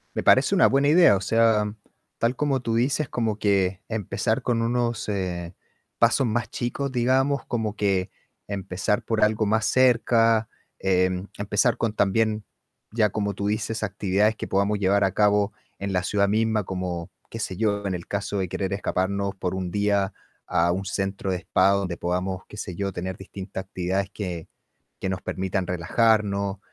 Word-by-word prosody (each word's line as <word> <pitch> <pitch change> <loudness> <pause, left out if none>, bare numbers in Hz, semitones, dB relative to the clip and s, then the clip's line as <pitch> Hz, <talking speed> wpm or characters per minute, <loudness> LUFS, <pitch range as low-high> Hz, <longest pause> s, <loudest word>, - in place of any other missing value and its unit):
Me - - -1
parece - - +5
una - - +6
buena 140 +1 +3
idea. 165 - +6
O - - -2
sea, 110 -1 +2 0.4
tal 120 +2 +1
como 140 -3 0
tú 115 -2 -2
dices, 135 +4 +1
como 110 -3 -1
que 100 -2 +1
empezar 110 -4 -1
con 120 -2 0
unos, 120 -2 -1
eh, 90 -3 -3 0.4
pasos 135 - +3
más 115 +1 -1
chicos, 130 +3 -3
digamos, 130 +3 +2
como 110 -3 -2
que 95 -3 0 0.4
empezar 100 0 -1
por 110 -2 -1
algo 110 0 +1
más 110 +1 +1
cerca, 115 -3 +3 0.3
em, 95 0 +1
empezar 105 0 +1
con 110 -2 -1
también, 105 +1 +1 0.5
ya 110 -1 +2
como 100 -1 -1
tú 100 +1 -3
dices, 110 +1 -2
actividades 105 +1 +1
que - - -5
podamos 100 +2 +1
llevar 100 +1 +3
a 95 - +1
cabo 105 0 +3 0.3
en 100 0 -3
la 90 - +2
ciudad 100 0 +1
misma, 110 -1 +1
como 90 -2 -4 0.2
qué 115 - -6
sé 95 -5 -4
yo, 100 -1 0
en 95 - -1
el 85 - -6
caso 100 0 -3
de 95 -2 -1
querer 95 +2 -3
escaparnos 100 0 -1
por 95 0 -2
un 90 -2 -3
día 100 0 +1 0.3
a 85 -1 +2
un 95 +2 -2
centro 95 0 -2
de 90 - 0
spa 95 +2 +3
donde 95 -3 0
podamos, 90 +1 -2
qué 105 - -11
sé 90 -4 -5
yo, 100 -1 -2
tener 95 +1 -4
distintas 95 0 -7
actividades 95 +1 -2
que 90 -5 -5 0.5
que - - -2
nos 95 0 -2
permitan 95 -1 -2
relajarnos. 100 +2 +1
100 Hz, 175 wpm, -25 LUFS, 95-110 Hz, 0.5 s, una